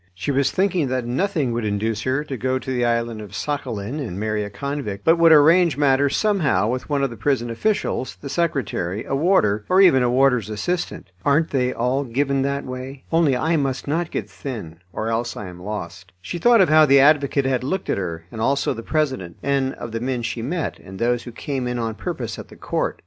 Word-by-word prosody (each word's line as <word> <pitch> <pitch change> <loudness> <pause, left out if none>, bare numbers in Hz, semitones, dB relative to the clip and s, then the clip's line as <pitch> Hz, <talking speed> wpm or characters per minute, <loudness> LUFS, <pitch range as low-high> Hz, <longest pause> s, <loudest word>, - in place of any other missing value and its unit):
She 95 +10 -2
was 140 0 +2
thinking 185 -6 +1
that 130 -1 -2
nothing 145 +1 0
would 115 0 -2
induce 110 +1 -1
her 130 +5 0
to 140 -3 -5
go 130 +2 -1
to 130 - -5
the 125 -1 0
island 115 -2 0
of 105 -1 -10
Sakhalin 130 -3 -3
and 110 -10 -5
marry 110 0 -1
a 105 - -5
convict, 105 -2 -5
but 165 +1 +4
would 165 -1 +6
arrange 160 +1 +6
matters 140 -1 +3
somehow 190 - +2
with 125 +4 -3
one 140 -2 +1
of 135 - 0
the - - -7
prison 120 +1 0
officials, 130 - -1
the 140 - -8
secretary, 135 - -2
a - - -4
warder, 135 - +2
or 185 - +4
even 175 -9 +6
a 125 - +2
warder's 125 -4 +2
assistant. 110 - -3
"Aren't 155 +3 +2
they 125 -2 +1
all 125 +4 0
given 135 +2 0
that 140 +1 -1
way? 130 +1 -7
Only 160 -6 +3
I 160 +5 +1
must 135 -2 -2
not 160 +3 -1
get - - -4
thin, 105 - -7
or 110 +5 -3
else 115 +1 -2
I 105 - -5
am 90 0 -11
lost." 95 -2 -7
She 95 - -6
thought 235 +2 +5
of 180 - +4
how 155 0 +6
the 140 0 +6
advocate 140 -1 +4
had 130 -2 0
looked 185 +8 -2
at - - 0
her, 85 -3 -5
and 110 - -6
also 140 +4 +1
the 115 - -7
president, 130 - -2
and 135 -1 0
of 120 - -7
the 115 - -3
men 125 0 -2
she 115 0 -3
met, 160 +7 -3
and 95 0 -11
those 120 +2 0
who 120 - -7
came 130 +1 -4
in 125 0 -2
on 115 -1 -2
purpose 120 -4 -5
at - - -9
the - - -14
court. - - -2
130 Hz, 225 wpm, -22 LUFS, 115-145 Hz, -, would